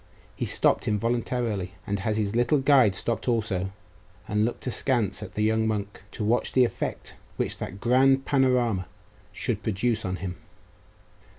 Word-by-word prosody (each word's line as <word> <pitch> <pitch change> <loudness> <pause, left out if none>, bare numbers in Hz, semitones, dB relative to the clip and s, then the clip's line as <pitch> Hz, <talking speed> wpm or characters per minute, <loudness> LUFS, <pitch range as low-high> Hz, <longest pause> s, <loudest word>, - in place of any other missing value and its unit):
He - - -2
stopped - - +2
involuntarily; 110 -3 -1
and 100 0 -2
his 105 0 -1
little 120 +5 +3
guide 130 -7 +4
stopped 115 +5 -2
also, 105 -6 0 0.6
and 105 +1 +1
looked 120 - -3
askance 120 -4 0
at - - -8
the 105 - 0
young 110 +1 +2
monk, 105 -1 -3
to - - -4
watch 115 +4 +1
the 130 -1 +5
effect - - -5 0.2
which - - -2
that 95 - -6
grand 135 +3 +3
panorama 125 - +2 0.4
should - - -2
produce 110 +2 0
on 95 -1 -2
him. 90 -2 -5
110 Hz, 150 wpm, -26 LUFS, 100-125 Hz, 0.6 s, the